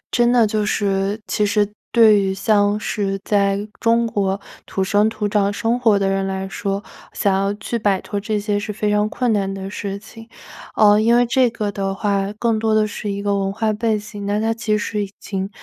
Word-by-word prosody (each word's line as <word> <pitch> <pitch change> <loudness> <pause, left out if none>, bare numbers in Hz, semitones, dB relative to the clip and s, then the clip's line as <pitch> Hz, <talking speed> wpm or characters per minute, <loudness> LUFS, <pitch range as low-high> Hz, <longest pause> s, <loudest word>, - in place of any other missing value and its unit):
真 240 -1 +3
的 240 -2 +5
就 215 0 0
是 200 0 0
其 210 - +1
实 205 0 +1 0.2
对 220 -3 +6
于 190 -1 -1
像 205 +1 +2
是 195 -2 -2
在 200 0 +1
中 230 +1 +2
国 200 -3 -1 0.3
土 190 - -2
生 205 +3 +3
土 215 -2 -2
长 200 -1 +1
生 230 +3 0
活 225 -4 +3
的 195 - +1
人 195 0 0
来 190 0 -3
说， 195 0 -3 0.3
想 200 - +1
要 195 +1 0
去 210 +3 -4
摆 205 -3 +1
脱 205 - -4
这 215 +1 -2
些 205 0 -1
是 210 +1 -4
非 210 0 -1
常 210 0 +2
困 245 +1 0
难 195 -2 0
的 195 0 -6
事 200 -1 -4
情。 225 +2 -13 0.5
呃 210 -1 +5
因 230 +2 +4
为 245 - +4
这 250 +1 +3
个 215 -3 -3
的 195 -1 -3
话， 200 -1 -1
更 230 0 +1
多 220 0 +1
的 215 0 +4
是 210 - -6
一 200 - -4
个 200 0 0
文 195 0 -1
化 220 +1 0
背 220 +1 0
景， 205 -1 -8
那 205 +1 0
它 225 +1 +1
其 225 -1 -1
实 210 0 -2
已 195 - -11
经 195 -1 -4
205 Hz, 235 characters per minute, -20 LUFS, 195-220 Hz, 0.5 s, 对